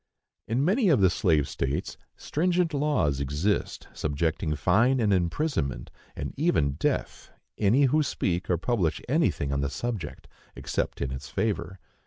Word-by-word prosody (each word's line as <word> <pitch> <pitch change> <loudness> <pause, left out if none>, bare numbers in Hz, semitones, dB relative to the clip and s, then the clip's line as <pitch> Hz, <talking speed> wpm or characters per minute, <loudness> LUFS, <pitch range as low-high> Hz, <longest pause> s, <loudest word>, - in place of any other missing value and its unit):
In 120 +5 +1
many 205 +3 +3
of 145 -8 +4
the 95 -3 +5
slave 80 -6 +2
states 70 +2 -3 0.2
stringent 175 +1 0
laws 140 - +1
exist, 75 +9 -1
subjecting 80 +2 -1
to 75 - 0
fine 120 - +3
and 105 -3 +2
imprisonment, 85 - -1 0.2
and - - -5
even 145 - +2
death, 70 - -2 0.3
any 110 +8 +4
who 145 +3 +3
speak 90 - -1
or 90 - +2
publish 95 -4 0
anything 70 - +1
upon 70 0 0
the 70 - -1
subject, 85 - -5 0.3
except - - -3
in 65 - -3
its 65 +1 -7
favor. 95 +1 -2
95 Hz, 150 wpm, -27 LUFS, -, 0.3 s, the